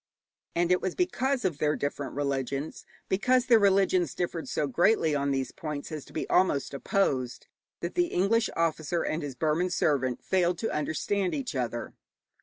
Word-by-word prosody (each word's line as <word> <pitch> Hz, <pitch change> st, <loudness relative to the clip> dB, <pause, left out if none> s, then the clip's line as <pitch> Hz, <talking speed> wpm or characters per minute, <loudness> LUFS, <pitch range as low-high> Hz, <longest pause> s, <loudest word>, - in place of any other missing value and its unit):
And 175 Hz, +1 st, +2 dB
it 180 Hz, -, +3 dB
was 185 Hz, -, -2 dB
because 275 Hz, -, 0 dB
of 165 Hz, -6 st, -1 dB
their 150 Hz, 0 st, +2 dB
different 145 Hz, -1 st, -3 dB
religions, 140 Hz, +1 st, -3 dB, 0.2 s
because 250 Hz, +6 st, +2 dB
their 235 Hz, -3 st, +6 dB
religions 190 Hz, -4 st, +3 dB
differed 175 Hz, -2 st, -3 dB
so -, -, 0 dB
greatly 165 Hz, -, +3 dB
on 140 Hz, -1 st, 0 dB
these 135 Hz, -2 st, -1 dB
points 150 Hz, -1 st, -6 dB
as 155 Hz, -3 st, -5 dB
to -, -, -16 dB
be 155 Hz, -, -3 dB
almost 160 Hz, -7 st, +2 dB
opposed, 135 Hz, -5 st, 0 dB, 0.4 s
that -, -, -3 dB
the 355 Hz, -1 st, +2 dB
English 220 Hz, -, +2 dB
officer 165 Hz, 0 st, 0 dB
and 155 Hz, -, -2 dB
his 140 Hz, -3 st, -5 dB
Burman 160 Hz, +6 st, +1 dB
servant 130 Hz, -7 st, 0 dB
failed 180 Hz, -2 st, +1 dB
to 225 Hz, -, -2 dB
understand 180 Hz, +6 st, -1 dB
each 265 Hz, -, -4 dB
other. 120 Hz, -2 st, -3 dB
165 Hz, 170 wpm, -28 LUFS, 140-190 Hz, 0.4 s, their